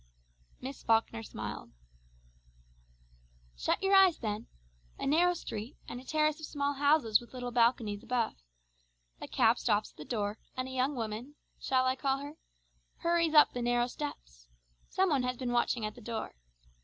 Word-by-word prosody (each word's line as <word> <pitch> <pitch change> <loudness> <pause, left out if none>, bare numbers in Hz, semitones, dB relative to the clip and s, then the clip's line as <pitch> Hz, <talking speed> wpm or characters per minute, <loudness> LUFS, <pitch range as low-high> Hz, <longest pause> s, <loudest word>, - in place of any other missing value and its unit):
Miss 265 +2 -7
Falkner 225 0 +2
smiled. 225 - -7 1.8
"Shut - - -1
your 390 +1 +3
eyes 385 -3 +7
then. 215 -1 -4 0.5
A - - -4
narrow 345 +5 +4
street, 230 -3 -6
and 245 - -6
a - - -15
terrace 305 +2 +1
of 315 - -6
small 285 -1 -1
houses 285 -6 +3
with 240 +2 -14
little 245 -1 -4
balconies 230 -3 +2
above. 240 -1 0 0.9
A - - -5
cab 230 -1 +3
stops 210 -2 +1
at - - -33
the 150 - -7
door, 205 +2 -2 0.2
and 255 0 -2
a - - -7
young 260 +2 0
woman 230 +4 -5 0.2
shall 255 -1 +2
I 255 0 +2
call 270 0 0
her? 285 +2 -7 0.7
hurries 335 -2 +2
up 300 - +7
the 245 - -3
narrow 240 0 +2
steps. 60 - -7 0.4
Some 380 -2 +2
one 280 -3 +3
has 250 0 -2
been 250 -1 -3
watching 240 -1 +1
at 215 - -4
the 240 - -13
door. 225 0 -4
250 Hz, 170 wpm, -31 LUFS, 225-290 Hz, 1.8 s, eyes